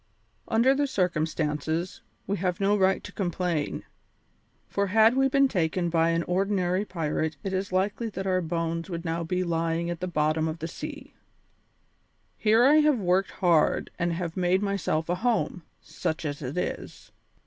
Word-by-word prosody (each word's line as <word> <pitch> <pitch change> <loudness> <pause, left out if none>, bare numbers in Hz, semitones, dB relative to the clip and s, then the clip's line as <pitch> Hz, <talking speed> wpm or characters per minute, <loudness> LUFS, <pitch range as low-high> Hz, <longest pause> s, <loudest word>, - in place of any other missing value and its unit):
Under 235 +4 +4
the 285 +1 +1
circumstances, 160 - -1 0.2
we 200 - -1
have 180 -1 -1
no 200 +1 +3
right 190 -1 +2
to 205 - -8
complain, 175 -5 -2 0.8
for 200 0 -1
had 220 +4 +5
we 270 0 +4
been 275 +1 +4
taken 175 -5 0
by 165 0 +3
an 165 0 +1
ordinary 185 0 0
pirate 160 -4 -2
it 195 - -3
is 190 +1 -2
likely 200 +5 0
that 195 -2 -5
our 185 -1 +1
bones 165 +1 -2
would 170 -1 -5
now 165 +1 -1
be 180 +2 -1
lying 165 0 -1
at 170 - -5
the 185 - -3
bottom 155 -1 +1
of 160 +1 -3
the 165 - -5
ocean. 165 - -7 1.2
"Here 225 +2 +4
I 295 +3 +6
have 300 -3 +4
worked 190 -1 +1
hard 170 -5 +2
and 170 0 +1
have 170 -1 -4
made 185 +2 +2
myself 195 -5 -1
a 175 - +1
home, 210 -2 0 0.2
such 160 0 -4
as 145 0 -4
it 135 +4 -5
is. - - -5
180 Hz, 170 wpm, -27 LUFS, 165-200 Hz, 1.2 s, I